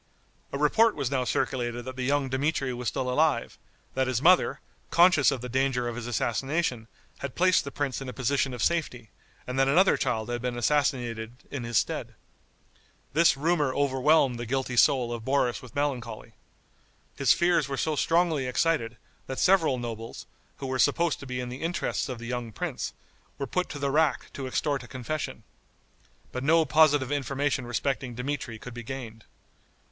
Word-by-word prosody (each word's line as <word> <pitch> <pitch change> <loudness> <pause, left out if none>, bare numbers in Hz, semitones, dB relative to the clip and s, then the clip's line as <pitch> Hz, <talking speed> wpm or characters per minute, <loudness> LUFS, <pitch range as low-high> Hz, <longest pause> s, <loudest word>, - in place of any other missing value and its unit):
A - - -3
report 215 +10 +4
was 140 -3 -2
now 130 -2 +1
circulated 120 -2 -1
that 130 0 -6
the 130 - -5
young 140 +2 +1
Dmitri 135 0 -1
was 120 0 -5
still 130 - -1
alive, 135 -1 +1 0.3
that 130 0 0
his 130 -2 0
mother, 180 +6 +4 0.3
conscious 170 -4 +5
of 135 -4 -2
the 125 - -5
danger 130 -1 0
of 120 - -4
his 120 0 -5
assassination, 125 +1 -1 0.3
had 140 -2 -5
placed 185 0 +4
the 140 - -6
prince 140 -2 -2
in 135 - -5
a - - -4
position 135 +1 0
of 125 -3 -3
safety, 125 -10 -1 0.3
and 125 +1 -3
that 135 - +4
another 180 +8 +4
child 110 +1 -1
had 120 -1 -2
been 125 -1 -2
assassinated 120 -4 0 0.2
in 140 -4 -4
his 115 -2 0
stead. - - -1 1.0
This 165 -3 +4
rumor 150 -3 +1
overwhelmed 135 -2 +3
the 120 - -5
guilty 130 0 -1
soul 120 -1 +4
of 115 -2 -6
Boris 130 -1 +1
with 125 -3 -13
melancholy. 125 -6 -3 0.8
His - - +3
fears 170 -4 +3
were 135 - -3
so 155 +3 0
strongly 165 -4 +2
excited, 125 -4 0 0.3
that 130 - -5
several 175 -8 +3
nobles, 115 -2 -6 0.3
who - - -6
were 130 0 -2
supposed 160 +3 +2
to 140 - -9
be 125 0 -3
in 125 -1 -4
the 125 +2 -7
interests 170 -3 -2
of 125 - -4
the 120 - -9
young 120 -1 -4
prince, - - -4 0.5
were 140 - -3
put 180 +7 -2
to - - -6
the 140 -1 -1
rack 155 -1 +1
to 135 -2 -5
extort 140 +2 -1
a 125 - -11
confession. 130 +6 -5 0.9
But 125 - -4
no 160 +2 +4
positive 145 -2 +4
information 140 -2 -1
respecting 130 0 -2
Dmitri 125 -2 -4
could 125 +2 -9
be 120 - -6
gained. 115 -3 -7
130 Hz, 180 wpm, -27 LUFS, 120-145 Hz, 1.0 s, conscious